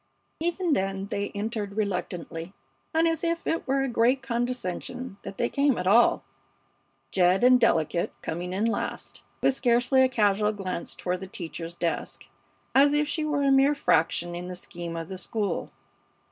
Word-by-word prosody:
Even 345 Hz, +1 st, -1 dB
then 195 Hz, -4 st, -1 dB
they 200 Hz, 0 st, -1 dB
entered 210 Hz, -1 st, -3 dB
reluctantly 180 Hz, -3 st, -3 dB, 0.4 s
and 325 Hz, +1 st, +3 dB
as 330 Hz, 0 st, -1 dB
if 335 Hz, 0 st, -1 dB
it 325 Hz, -, -1 dB
were 270 Hz, +1 st, +2 dB
a -, -, 0 dB
great 245 Hz, +2 st, +2 dB
condescension 245 Hz, -1 st, -3 dB
that 195 Hz, -, -8 dB
they 240 Hz, -, +1 dB
came 280 Hz, -1 st, +2 dB
at 180 Hz, -, -3 dB
all, 225 Hz, +6 st, +5 dB, 0.9 s
Jed 185 Hz, +2 st, +3 dB
and 250 Hz, 0 st, +7 dB
"Delicate" 170 Hz, -7 st, +2 dB
coming 175 Hz, +2 st, -4 dB
in 195 Hz, +4 st, 0 dB
last, 230 Hz, -, -3 dB, 0.2 s
with 270 Hz, -, +4 dB
scarcely 245 Hz, +1 st, +3 dB
a 260 Hz, -, +5 dB
casual 210 Hz, -3 st, +2 dB
glance 185 Hz, -4 st, -4 dB
toward 180 Hz, 0 st, -2 dB
the 190 Hz, -, -7 dB
teacher's 170 Hz, -2 st, -7 dB
desk, 170 Hz, -1 st, -3 dB, 0.5 s
as 285 Hz, +2 st, +5 dB
if 295 Hz, 0 st, +2 dB
she 310 Hz, +1 st, -1 dB
were 295 Hz, -2 st, 0 dB
a 275 Hz, -, +3 dB
mere 270 Hz, +2 st, +5 dB
fraction 175 Hz, -, +1 dB
in 175 Hz, +1 st, -5 dB
the 180 Hz, -, -6 dB
scheme 175 Hz, -2 st, -6 dB
of 165 Hz, -1 st, -5 dB
the 190 Hz, 0 st, -4 dB
school. 205 Hz, -6 st, -2 dB
215 Hz, 170 wpm, -27 LUFS, 180-270 Hz, 0.9 s, and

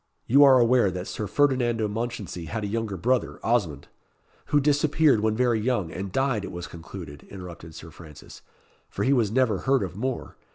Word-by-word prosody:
You 140 Hz, +5 st, +6 dB
are 135 Hz, -2 st, +7 dB
aware 120 Hz, -3 st, +4 dB
that 90 Hz, 0 st, -5 dB
Sir 105 Hz, -, -4 dB
Ferdinando 120 Hz, -4 st, +1 dB
Mounchensey 105 Hz, -5 st, -5 dB
had 105 Hz, +8 st, -4 dB
a -, -, -2 dB
younger 110 Hz, -2 st, -3 dB
brother, 125 Hz, +6 st, 0 dB
Osmond 90 Hz, -, 0 dB, 0.3 s
" -, -, -36 dB
"Who 145 Hz, -, +3 dB
disappeared 145 Hz, -1 st, +3 dB
when 110 Hz, 0 st, 0 dB
very 120 Hz, -1 st, +2 dB
young, 110 Hz, -7 st, -1 dB
and 95 Hz, +3 st, -5 dB
died, 130 Hz, -3 st, 0 dB
it -, -, -6 dB
was 90 Hz, 0 st, -6 dB
concluded," 85 Hz, -4 st, -10 dB
interrupted 85 Hz, -4 st, -10 dB
Sir 80 Hz, 0 st, -10 dB
Francis, 75 Hz, -3 st, -13 dB, 0.5 s
"for -, -, -3 dB
he 135 Hz, -, +3 dB
was 115 Hz, -6 st, +2 dB
never 115 Hz, -4 st, +1 dB
heard 135 Hz, -3 st, +1 dB
of 90 Hz, -1 st, -6 dB
more. 130 Hz, +4 st, -4 dB
110 Hz, 190 wpm, -25 LUFS, 90-130 Hz, 0.5 s, are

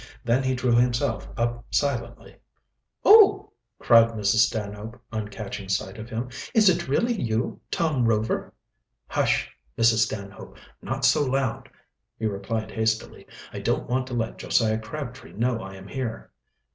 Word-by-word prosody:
Then 120 Hz, +3 st, +2 dB
he 130 Hz, -1 st, 0 dB
drew 125 Hz, -1 st, 0 dB
himself 120 Hz, +1 st, +1 dB
up 120 Hz, 0 st, -1 dB
silently. 120 Hz, -5 st, -2 dB, 0.7 s
"Oh!" 425 Hz, -1 st, +7 dB, 0.3 s
cried 115 Hz, -1 st, +6 dB
Mrs. 110 Hz, +1 st, +3 dB
Stanhope, 110 Hz, +1 st, -6 dB
on 110 Hz, -2 st, -3 dB
catching 100 Hz, -2 st, -7 dB
sight 95 Hz, +2 st, -2 dB
of 110 Hz, +2 st, -8 dB
him. 120 Hz, +1 st, -4 dB, 0.2 s
"Is 215 Hz, -3 st, +6 dB
it 170 Hz, -1 st, 0 dB
really 230 Hz, -, +1 dB
you, 115 Hz, -, -2 dB
Tom 155 Hz, -7 st, +1 dB
Rover?" 110 Hz, 0 st, 0 dB, 0.5 s
"Hush, -, -, 0 dB, 0.2 s
Mrs. 115 Hz, -1 st, +4 dB
Stanhope! 100 Hz, -2 st, -8 dB, 0.2 s
not -, -, -2 dB
so 150 Hz, -, +4 dB
loud," 130 Hz, -3 st, -1 dB, 0.5 s
he 110 Hz, -, -4 dB
replied 110 Hz, +2 st, -3 dB
hastily. 110 Hz, 0 st, -2 dB, 0.3 s
"I -, -, -5 dB
don't -, -, -1 dB
want 130 Hz, +1 st, -1 dB
to 125 Hz, -, -5 dB
let 115 Hz, -1 st, -3 dB
Josiah 110 Hz, -1 st, +1 dB
Crabtree 130 Hz, +1 st, -8 dB
know 115 Hz, +1 st, 0 dB
I 95 Hz, 0 st, -8 dB
am 95 Hz, 0 st, -11 dB
here." 120 Hz, -1 st, -5 dB
115 Hz, 145 wpm, -25 LUFS, 110-130 Hz, 0.7 s, Oh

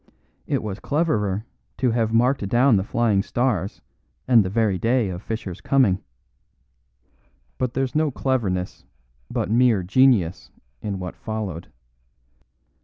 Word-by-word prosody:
It -, -, -1 dB
was 100 Hz, -3 st, -5 dB
cleverer 110 Hz, -, 0 dB, 0.3 s
to 125 Hz, -2 st, +1 dB
have 115 Hz, -1 st, 0 dB
marked 115 Hz, -2 st, +2 dB
down 120 Hz, +2 st, +4 dB
the 95 Hz, -, +1 dB
Flying 105 Hz, -2 st, +1 dB
Stars 105 Hz, -4 st, -1 dB, 0.5 s
and 120 Hz, -4 st, +6 dB
the 95 Hz, -, -3 dB
very 105 Hz, -2 st, +1 dB
day 115 Hz, -1 st, +1 dB
of 90 Hz, 0 st, -6 dB
Fischer's 105 Hz, -5 st, -5 dB
coming. 120 Hz, -9 st, +2 dB, 1.6 s
But 125 Hz, -1 st, -2 dB
there's 135 Hz, -1 st, -1 dB
no 155 Hz, 0 st, +2 dB
cleverness, 110 Hz, -10 st, -2 dB, 0.5 s
but -, -, -2 dB
mere 115 Hz, -4 st, +3 dB
genius, 105 Hz, -4 st, +2 dB, 0.3 s
in 100 Hz, -2 st, -3 dB
what 90 Hz, -2 st, -6 dB
followed. 105 Hz, -7 st, -5 dB
110 Hz, 125 wpm, -23 LUFS, 95-125 Hz, 1.6 s, and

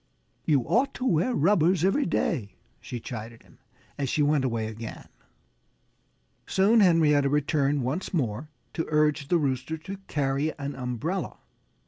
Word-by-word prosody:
"You 145 Hz, -4 st, +3 dB
ought 250 Hz, -, +1 dB
to 255 Hz, -, -4 dB
wear 185 Hz, +4 st, +2 dB
rubbers 175 Hz, 0 st, +3 dB
every 195 Hz, +10 st, +2 dB
day," 105 Hz, -, -1 dB, 0.2 s
she 120 Hz, -, -6 dB
chided 115 Hz, 0 st, -8 dB
him, -, -, -22 dB, 0.4 s
as 135 Hz, -2 st, -1 dB
she 150 Hz, -, +1 dB
went 145 Hz, -1 st, +2 dB
away 115 Hz, -4 st, -1 dB
again. 110 Hz, +1 st, -7 dB, 1.4 s
Soon 205 Hz, +4 st, +4 dB
Henrietta 155 Hz, -7 st, +4 dB
returned 145 Hz, -1 st, +1 dB
once 145 Hz, +10 st, -3 dB
more 130 Hz, -, -2 dB, 0.2 s
to 165 Hz, -, -3 dB
urge 150 Hz, -1 st, +2 dB
the 175 Hz, -, +3 dB
Rooster 140 Hz, +1 st, -1 dB
to 195 Hz, +5 st, -8 dB
carry 140 Hz, +1 st, -1 dB
an 140 Hz, 0 st, -4 dB
umbrella. 130 Hz, -, -3 dB
150 Hz, 140 wpm, -27 LUFS, 130-170 Hz, 1.4 s, Soon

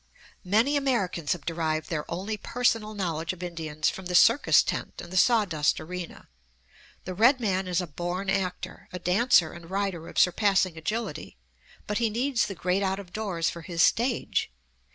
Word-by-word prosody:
Many 225 Hz, +10 st, +2 dB
Americans 205 Hz, -, 0 dB
have 170 Hz, -5 st, -9 dB
derived 160 Hz, -2 st, -2 dB
their 150 Hz, -3 st, -3 dB
only 195 Hz, +6 st, -3 dB
personal 220 Hz, -1 st, -1 dB
knowledge 165 Hz, -4 st, -2 dB
of 185 Hz, 0 st, -9 dB
Indians 160 Hz, -3 st, -3 dB
from 190 Hz, -1 st, -8 dB
the 180 Hz, -, -2 dB
circus 230 Hz, +9 st, +6 dB
tent -, -, -4 dB
and 175 Hz, +1 st, -9 dB
the -, -, -4 dB
sawdust 185 Hz, -8 st, +3 dB
arena. 180 Hz, +1 st, -7 dB, 0.8 s
The 185 Hz, -, -4 dB
red 240 Hz, +8 st, +4 dB
man 190 Hz, -5 st, -1 dB
is 180 Hz, 0 st, 0 dB
a -, -, -3 dB
born 175 Hz, +5 st, -4 dB
actor, 190 Hz, -2 st, -3 dB
a 180 Hz, -, -5 dB
dancer 180 Hz, -1 st, +3 dB
and 170 Hz, -1 st, -12 dB
rider 190 Hz, -4 st, -2 dB
of -, -, -11 dB
surpassing 190 Hz, -1 st, +3 dB
agility, 205 Hz, -, -4 dB, 0.5 s
but 210 Hz, 0 st, -2 dB
he 230 Hz, -2 st, +2 dB
needs 245 Hz, +3 st, 0 dB
the 195 Hz, -, -6 dB
great 180 Hz, +4 st, 0 dB
out 190 Hz, -1 st, 0 dB
of 190 Hz, -3 st, -10 dB
doors 190 Hz, -6 st, -1 dB
for 170 Hz, -, -9 dB
his 165 Hz, 0 st, 0 dB
stage. 240 Hz, -, +1 dB
185 Hz, 175 wpm, -27 LUFS, 170-215 Hz, 0.8 s, circus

